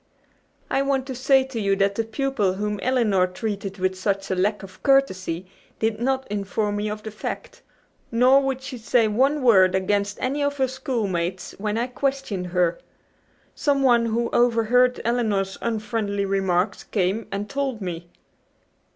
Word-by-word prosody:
"I 270 - +1
want 275 -1 0
to 265 - -5
say 265 +1 +4
to 260 -4 -5
you 200 -1 +2
that 195 0 +2
the 225 - -1
pupil 225 -4 0
whom 210 +1 -3
Elinor 220 -8 +2
treated 195 0 -4
with 185 0 0
such 195 +1 -2
a - - +1
lack 205 +3 0
of 185 -1 -12
courtesy 190 - +1 0.3
did 220 -1 -1
not 265 +1 0
inform 205 +1 -1
me 210 +1 -2
of 210 0 -6
the 220 - -6
fact. 215 - -6 0.5
Nor 255 +4 +5
would 265 -1 -2
she 265 -2 -7
say 225 0 +2
one 265 +7 +2
word 190 -6 +5
against 200 +2 0
any 275 +3 -1
of 285 0 0
her 265 -1 +2
schoolmates 205 - -3
when 210 +1 -1
I 235 - +1
questioned 255 -7 -2
her. 175 -1 +1 0.7
Someone 265 -5 +3
who 235 +1 -1
overheard 245 +1 +3
Elinor's 215 -5 0
unfriendly 215 -3 -1
remarks 195 0 0
came 200 +2 -1
and 200 +1 -3
told 270 -2 -2
me." 175 -3 -6
215 Hz, 160 wpm, -24 LUFS, 195-255 Hz, 0.7 s, Nor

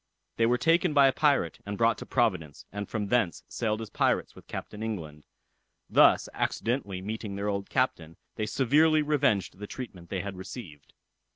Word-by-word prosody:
They 115 - +3
were 125 +1 +3
taken 165 +3 +2
by 140 -1 +7
a 135 - +2
pirate, 140 - +2
and 100 0 -5
brought 115 0 +2
to - - -8
Providence, 90 - 0
and 100 0 -5
from 105 -2 -3
thence 115 -8 +1
sailed 110 -1 -2
as 110 - -10
pirates - - +1
with - - -16
Captain 105 - -7
England. 80 -10 -5 0.6
Thus - - +5
accidentally 100 -6 -2
meeting 105 -1 -5
their 100 +1 -2
old 100 -1 -3
captain, 85 -11 -1 0.2
they 110 - -3
severely 150 +7 +3
revenged 110 - +1
the 105 - -6
treatment 95 -10 -8
they 95 - -2
had 100 -1 -6
received. 90 - -9
105 Hz, 175 wpm, -28 LUFS, 95-125 Hz, 0.6 s, by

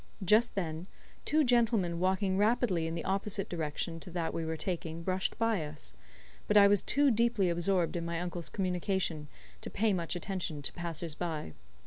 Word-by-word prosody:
Just 220 +5 +4
then, 165 -2 -3 0.4
two 310 +1 +3
gentlemen 230 -9 +2
walking 190 +1 +1
rapidly 205 -5 +2
in 165 - -3
the 165 - -4
opposite 195 +1 -1
direction 165 0 -3
to 180 - -10
that 170 -2 -2
we 165 - -2
were 160 0 -3
taking 165 -2 -4
brushed 185 +1 -1
by 225 -7 +1
us; 150 - -8 0.5
but - - +4
I 200 -1 +9
was 200 -1 +4
too 285 -1 +3
deeply 230 -5 +2
absorbed 175 0 +1
in 170 - -2
my 170 0 -2
uncle's 175 -1 -4
communication 180 -4 -1 0.3
to - - -6
pay 215 -1 +1
much 170 -1 -2
attention 175 -5 -4
to - - -1
passers 170 -2 -4
by. 155 - -4
180 Hz, 175 wpm, -31 LUFS, 165-200 Hz, 0.5 s, I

